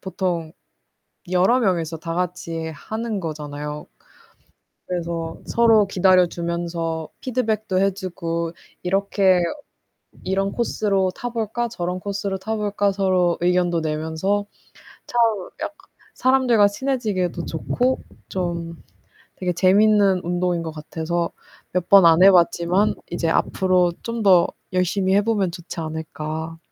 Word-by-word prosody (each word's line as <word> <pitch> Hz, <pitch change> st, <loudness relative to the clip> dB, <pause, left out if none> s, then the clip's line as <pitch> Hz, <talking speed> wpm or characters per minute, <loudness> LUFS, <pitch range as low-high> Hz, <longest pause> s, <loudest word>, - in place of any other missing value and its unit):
보통 175 Hz, -4 st, -3 dB, 0.8 s
여러 190 Hz, +8 st, +4 dB
명이서 170 Hz, -7 st, 0 dB
다 165 Hz, +1 st, -5 dB
같이 170 Hz, -2 st, -3 dB
하는 220 Hz, +7 st, -4 dB
거잖아요. 150 Hz, -2 st, -5 dB, 1.0 s
그래서 170 Hz, -2 st, -4 dB
서로 225 Hz, -3 st, +4 dB
기다려 185 Hz, -1 st, +4 dB
주면서 170 Hz, -2 st, -3 dB
피드백도 220 Hz, -6 st, -1 dB
해 195 Hz, +1 st, +3 dB
주고 170 Hz, -3 st, -3 dB, 0.3 s
이렇게 195 Hz, 0 st, +2 dB, 0.8 s
"이런 195 Hz, +1 st, 0 dB
코스로 200 Hz, -5 st, 0 dB
타 245 Hz, -, -5 dB
볼까? 235 Hz, +1 st, -2 dB
저런 180 Hz, -4 st, -3 dB
코스로 200 Hz, 0 st, -3 dB
타 220 Hz, +4 st, -3 dB
볼까?" 205 Hz, -1 st, 0 dB
서로 185 Hz, -3 st, +1 dB
의견도 175 Hz, -1 st, +2 dB
내면서 160 Hz, +6 st, -1 dB, 0.6 s
참 240 Hz, -, -3 dB, 0.4 s
약 305 Hz, -, -4 dB, 0.4 s
사람들과 255 Hz, -5 st, +4 dB
친해지기에도 200 Hz, -8 st, -2 dB
좋고 250 Hz, +10 st, -1 dB, 0.3 s
좀 170 Hz, -2 st, -3 dB, 0.6 s
되게 180 Hz, -1 st, -1 dB
재밌는 195 Hz, +1 st, +4 dB
운동인 175 Hz, 0 st, 0 dB
것 160 Hz, -1 st, -5 dB
같아서 160 Hz, +2 st, -3 dB, 0.4 s
몇 180 Hz, -1 st, -1 dB
번 195 Hz, -3 st, +8 dB
안 165 Hz, +2 st, +6 dB
해 195 Hz, -, +10 dB
봤지만 175 Hz, +2 st, +3 dB, 0.2 s
이제 170 Hz, -1 st, -1 dB
앞으로 180 Hz, 0 st, +2 dB
좀 230 Hz, -1 st, -3 dB
더 185 Hz, -4 st, +6 dB, 0.3 s
열심히 185 Hz, +1 st, +1 dB
해 205 Hz, -, +4 dB
보면 205 Hz, -5 st, +1 dB
좋지 175 Hz, -1 st, -7 dB
않을까. 160 Hz, 0 st, -5 dB
180 Hz, 255 characters per minute, -22 LUFS, 170-200 Hz, 1.0 s, 해